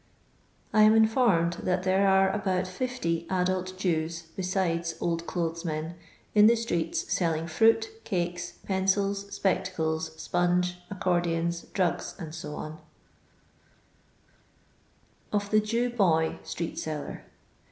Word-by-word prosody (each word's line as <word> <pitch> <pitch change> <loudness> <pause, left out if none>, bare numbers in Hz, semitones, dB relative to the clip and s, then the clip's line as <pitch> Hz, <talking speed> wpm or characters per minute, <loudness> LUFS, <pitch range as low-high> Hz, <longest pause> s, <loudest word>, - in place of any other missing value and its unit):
I 215 - +5
am 215 +1 +7
informed 220 -7 +3
that 180 0 0
there 190 +1 +3
are 190 0 +4
abont 190 -2 0
50 185 -5 -2
adult 185 0 -1
Jews 170 -2 -1
(besides 175 -3 -1
old 170 -1 -1
clothes 170 -1 -2
men) 160 0 -3 0.4
in 210 0 +7
the 235 - +6
streets 230 - -1
■elling 165 - 0
fruit, 225 - +3
cakes, 175 -2 -2
pencils, 195 +1 +1
spectadM, 160 -5 -1
iponge, 175 +2 0
accordions, 175 -3 0
drugs, 180 -4 0
dec 155 -2 -6 2.5
Ov 205 -1 -1
THa 215 - +6
Jaw 230 +3 0
BoT 170 -9 +1
STRBST 170 -1 -4
SlLin 155 -2 -5
180 Hz, 110 wpm, -28 LUFS, 165-200 Hz, 2.5 s, am